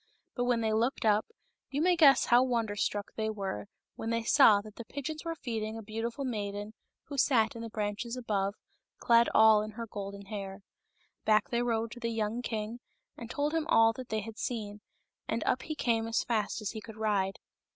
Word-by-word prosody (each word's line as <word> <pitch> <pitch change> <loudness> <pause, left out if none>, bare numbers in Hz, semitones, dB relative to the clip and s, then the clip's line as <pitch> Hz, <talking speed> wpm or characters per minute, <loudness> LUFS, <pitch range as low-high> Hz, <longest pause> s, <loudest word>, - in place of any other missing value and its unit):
But 245 - -1
when 245 -2 +2
they 220 -1 +1
looked 230 +3 0
up, 215 0 +3 0.4
you 275 - -2
may 355 +3 +4
guess 290 -5 +6
how 240 +1 +6
wonder 230 -5 0
struck 205 0 -2
they 220 0 -1
were 195 - -4 0.3
when 225 - -4
they 230 0 0
saw 225 -4 +6
that 215 0 -13
the 235 - -7
pigeons 305 +4 -5
were 330 -1 -3
feeding 225 -6 -4
a 225 - -7
beautiful 230 +5 -4
maiden 205 -3 -4 0.3
who 280 -2 -5
sat 235 -5 +3
in 230 - -6
the 230 - -5
branches 215 +3 -3
above, 200 -4 -1 0.4
clad 235 0 +4
all 220 -1 +7
in 215 0 -6
her 230 +2 -5
golden 200 -2 -7
hair. 195 -1 -6 0.6
Back 215 -1 +3
they 235 0 +1
rode 230 -1 0
to 240 - -9
the 230 -1 -2
young 225 +1 -1
king 225 0 -4 0.4
and 235 - -9
told 290 +5 -1
him 325 -1 0
all 225 0 +5
that 255 +1 -9
they 220 0 -1
had 220 +1 -9
seen, 210 -4 -4 0.5
and - - -1
up - - +1
he 310 - -5
came 225 -5 0
as 230 - 0
fast 220 -1 -1
as 210 - -2
he 220 - -7
could 220 0 -11
ride. 200 -3 0
225 Hz, 205 wpm, -31 LUFS, 210-240 Hz, 0.6 s, all